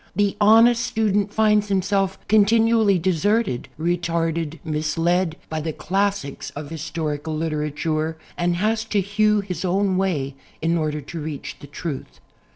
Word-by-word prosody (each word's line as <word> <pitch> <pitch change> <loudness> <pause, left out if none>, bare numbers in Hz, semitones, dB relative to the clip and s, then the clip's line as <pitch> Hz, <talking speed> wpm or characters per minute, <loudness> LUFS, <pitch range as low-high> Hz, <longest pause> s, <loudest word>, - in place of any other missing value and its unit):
The 205 +1 +1
honest 230 +3 +6
student 210 -4 0
finds 210 -1 +3
himself 195 0 0
continually 220 -1 +4
de 185 +2 +1
serted, 200 - +1
retarded, 165 -1 -1
misled, 165 +2 0
by 155 0 -3
the 160 0 -3
classics 195 -6 -2
of 145 +1 -7
his 160 -2 -5
torical 155 -1 -3
literature... 155 0 -2 0.2
and 175 0 0
has 215 +4 0
to 210 -2 0
hew 210 +2 +2
his 185 -4 -5
own 190 +1 +1
way 155 -8 0 0.3
in 165 +1 +1
order 155 -2 -1
to 160 +3 -7
reach 150 -2 -6
the 145 - -11
truth. 145 0 -6
175 Hz, 145 wpm, -22 LUFS, 155-205 Hz, 0.3 s, honest